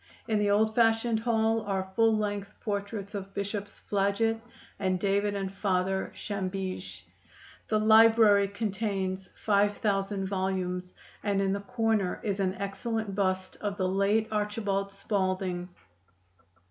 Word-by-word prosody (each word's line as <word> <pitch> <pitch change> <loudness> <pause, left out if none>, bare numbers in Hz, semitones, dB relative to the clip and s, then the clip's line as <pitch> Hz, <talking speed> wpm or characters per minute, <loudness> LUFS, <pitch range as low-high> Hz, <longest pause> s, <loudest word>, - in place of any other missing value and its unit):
In 215 -2 +1
the 205 0 +2
old 215 +2 +3
fashioned 225 0 +3
hall 225 -1 +1
are 190 -2 -3
full 225 -1 +4
length 205 -1 -3
portraits 205 0 -3
of 195 -1 -6
Bishops 200 0 -4
Flaget 205 +3 +1 0.4
and 185 -2 0
David 200 +1 +1
and 195 -1 -3
Father 190 -1 0
Chambige. 185 - -4 0.7
The 215 - +3
library 220 -2 +6
contains 195 -2 -2 0.2
five 205 -1 +3
thousand 195 -2 0
volumes, 185 -1 -2 0.3
and 200 -2 +1
in 195 0 +1
the 200 - -1
corner 225 -4 0
is 200 -2 -1
an 190 -1 0
excellent 200 +2 -3
bust 185 -1 -1
of 205 -1 -2
the 185 - +1
late 200 +3 +2
Archbishop 205 -2 -1
Spalding. 185 -3 -1
200 Hz, 130 wpm, -29 LUFS, 190-215 Hz, 0.7 s, library